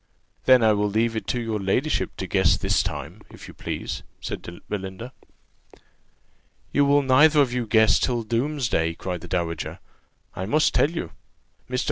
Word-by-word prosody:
"Then 130 -2 +6
I 110 -1 +5
will 105 0 0
leave 115 +2 0
it 110 - -4
to 125 - -1
your 115 -2 -2
ladyship 115 +10 -1
to - - -4
guess - - +3
this - - +1
time, - - -6
if - - -12
you - - -11
please," - - -5 0.2
said - - -5 0.3
Belinda. 100 +5 -6 1.6
"You 145 - +4
will 145 0 +4
neither 145 +4 +5
of 130 -4 +3
you 125 -2 -2
guess 110 0 +4
till 120 -2 0
doomsday!" 115 - -1
cried 90 -1 -5
the 90 - -9
dowager; 85 -2 -3 0.6
"I 95 - -4
must 155 +7 +2
tell 145 - +3
you. 160 - -5 0.6
Mr. 125 0 -1
115 Hz, 165 wpm, -24 LUFS, 100-130 Hz, 1.6 s, Then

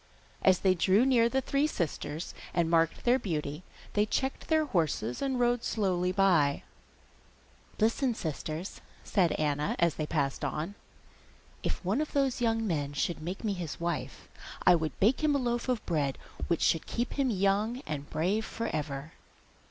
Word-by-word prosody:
As 185 -1 +5
they 190 -1 +4
drew 190 +6 +3
near 240 -3 +4
the 265 +2 +1
three 280 +3 +1
sisters, 160 - -3 0.2
and 170 -1 +2
marked 165 -1 +2
their 250 +2 +4
beauty, 150 - -3 0.3
they 205 - +3
checked 265 +5 -2
their 315 -1 +3
horses 160 - -1
and 265 -2 0
rode 240 -1 +2
slowly 180 -4 0
by. 180 -7 +3 1.1
'Listen, 230 +3 +2
sisters!' 160 +2 -5 0.2
said 180 -5 +2
Anna, 150 -1 0
as 170 -2 +3
they 155 - -2
passed 140 -4 -1
on. 160 +6 -2 0.9
'If - - -3
one 210 +10 +1
of 310 - -4
those 270 -3 +1
young 225 -1 +1
men 145 -7 -1
should 155 +3 -1
make 180 +7 -5
me 210 -3 0
his 175 -5 -5
wife, 170 0 -3 0.4
I 180 - +8
would 160 -5 -1
bake 240 +10 +3
him 300 -2 +3
a - - +4
loaf 240 -1 -1
of 245 -3 0
bread 145 -5 0 0.3
which 170 - 0
should 165 - +2
keep 240 +1 -2
him 275 -2 +1
young 210 +4 +1
and 145 -2 -5
brave 190 +8 0
for 230 +1 -4
ever. 145 0 -4
185 Hz, 165 wpm, -30 LUFS, 155-240 Hz, 1.1 s, I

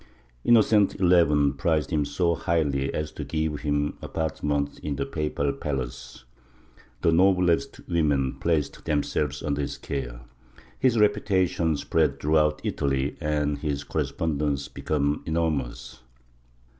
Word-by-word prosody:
Innocent 110 -3 +4
XI 85 -6 +4
prized 80 -2 +1
him 75 -3 +1
so 85 +3 +1
highly 75 -5 0
as 75 0 -3
to - - -6
give 80 -2 -2
him 75 0 -1
apartments 75 -2 -2
in 75 -2 -3
the - - -2
papal 75 -2 -1
palace; 65 -3 -5 0.8
the 85 - +3
noblest 90 -3 +2
women 75 -5 +1
placed 80 -4 -1
themselves 75 -1 -1
under 75 -1 -1
his 70 - -4
care; 60 -4 -5 0.6
his 125 -3 +3
reputation 95 -6 +2
spread 70 0 +1
throughout 75 0 +2
Italy 70 0 -1
and 75 -2 0
his 70 -2 -2
correspondence 75 -2 -1
became 75 -1 -1
enormous. 80 -7 -2
75 Hz, 120 wpm, -26 LUFS, 70-80 Hz, 0.8 s, Innocent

